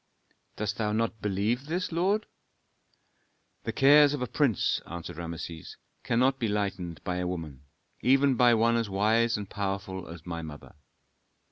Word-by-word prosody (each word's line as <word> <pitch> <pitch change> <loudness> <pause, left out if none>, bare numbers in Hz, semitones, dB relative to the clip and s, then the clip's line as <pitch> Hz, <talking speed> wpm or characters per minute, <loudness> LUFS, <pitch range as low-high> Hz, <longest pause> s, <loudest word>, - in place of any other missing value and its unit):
"Dost 105 +2 -3
thou 105 -2 0
not 110 0 -1
believe 105 +7 -1
this, 180 +4 -2
lord?" 195 +6 +1 1.4
"The 115 - -1
cares 145 +4 +6
of 130 - -3
a - - -2
prince," 130 - +1
answered 85 -1 -7
Rameses, 85 -1 -7 0.3
"cannot 130 +3 +2
be 115 - 0
lightened 95 -6 -3
by 90 0 -2
a 90 0 -1
woman, 80 -6 -6 0.4
even 135 +2 +4
by 120 -1 +5
one 115 +1 +3
as 115 -3 -1
wise 110 +4 +2
and 105 -1 -6
powerful 95 -2 -4
as 85 -1 -10
my 85 -2 -4
mother." 75 -3 -10
105 Hz, 150 wpm, -28 LUFS, 90-125 Hz, 1.4 s, cares